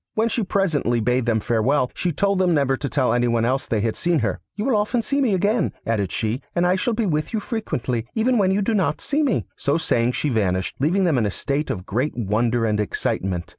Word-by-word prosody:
When 225 +1 +2
she 230 - -1
presently 160 - +1
bade 125 +2 +1
them 115 -2 +2
farewell, 120 +4 +1
she 180 - -1
told 200 +4 +1
them 180 -3 +3
never 140 -2 +2
to 140 +1 -4
tell 130 -2 +1
anyone 120 -1 +2
else 130 +3 0
that - - -1
they 105 - +1
had 110 0 -1
seen 175 -1 +1
her. - - -2 0.2
'You 210 - -3
will 265 - +2
often 215 +3 +1
see 280 +6 0
me 230 -8 +2
again,' 205 +2 +1
added 105 -5 -1
she, 110 +4 -2
'and 175 - +2
I 180 +1 +3
shall 225 +4 0
be 225 0 0
with 155 -1 -1
you 220 - +1
frequently, 130 - -3
even 235 +2 +2
when 190 -2 +3
you 200 +2 +1
do 225 - 0
not 200 -3 +1
see 290 +2 -1
me.' 270 -9 +1
So 140 +3 +1
saying 120 -6 +1
she 150 - -1
vanished, 95 -6 0
leaving 175 +8 +2
them 160 -8 +2
in 110 - +1
a - - -1
state 140 +9 -2
of 95 - -4
great 125 +9 -2
wonder 115 +2 +1
and 105 -1 0
excitement. 95 -3 -2
140 Hz, 245 wpm, -22 LUFS, -, 0.2 s, them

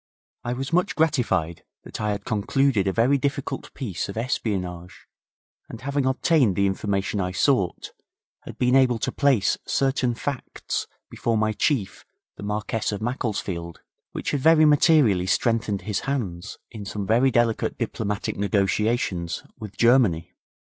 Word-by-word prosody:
I 120 - -2
was 135 +5 -5
much 180 +2 +2
gratified 120 - 0 0.2
that - - -7
I 105 - 0
had 100 -1 -3
concluded 110 0 +1
a - - +2
very 125 +7 +2
difficult 140 0 -3
piece 100 -10 -4
of 100 - -6
espionage, 90 -7 -3 0.6
and 115 - -9
having 140 0 -1
obtained 130 - +2
the 100 - +2
information 100 +1 -1
I 90 -1 -2
sought, 95 -3 +1 0.5
had - - -11
been 125 +1 +2
able 130 -3 +4
to - - -2
place 135 -9 +2
certain 135 -3 +1
facts 135 +2 -4 0.2
before 115 -1 -1
my 110 0 +1
Chief, 105 -5 -1 0.3
the - - -11
Marquess 105 +2 -2
of 100 - -3
Macclesfield, 100 - -3 0.3
which - - -3
had 145 - 0
very 155 +2 +5
materially 145 - +4
strengthened 110 -1 0
his 105 -2 -2
hands 105 -11 -4
in 110 -3 -8
some 100 0 -4
very 120 +6 +3
delicate 120 -2 +1
diplomatic 105 0 -3
negotiations 100 -3 0 0.2
with 105 -2 -9
Germany. 115 -9 +3
110 Hz, 145 wpm, -24 LUFS, 100-130 Hz, 0.6 s, very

